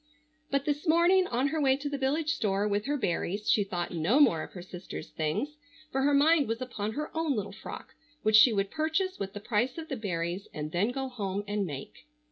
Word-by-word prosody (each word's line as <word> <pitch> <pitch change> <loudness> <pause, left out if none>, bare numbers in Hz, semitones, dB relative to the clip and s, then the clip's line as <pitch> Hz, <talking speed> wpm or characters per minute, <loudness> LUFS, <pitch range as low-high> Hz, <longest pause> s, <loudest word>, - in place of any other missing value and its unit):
But 275 0 0
this 295 +3 -1
morning 350 +3 +5
on 255 +4 +1
her 315 +1 -1
way 265 -1 +4
to 290 +1 -5
the 285 - -2
village 295 +4 0
store 200 -1 0
with 205 +1 0
her 290 +1 +1
berries 200 -1 -2
she 210 - +4
thought 175 -3 -3
no 175 - +2
more 205 - +5
of - - -8
her 180 - -8
sister's 180 0 -8
things, 165 - -2 0.3
for 270 - 0
her 285 +2 +3
mind 300 0 +5
was 225 +1 -2
upon 220 -4 -4
her 300 +5 -5
own 320 -4 +1
little 205 -2 -3
frock 195 - -9 0.3
which 215 0 +4
she 215 +3 +8
would 195 -2 0
purchase 320 +5 -1
with 195 0 -4
the 205 - -5
price 235 +5 0
of 320 -1 -6
the 270 - -2
berries, 180 -3 -3
and 150 0 -4
then 185 +7 +1
go 265 +1 -3
home 205 -5 -3
and 205 -1 -1
make. 140 - -8
230 Hz, 225 wpm, -29 LUFS, 195-290 Hz, 0.3 s, she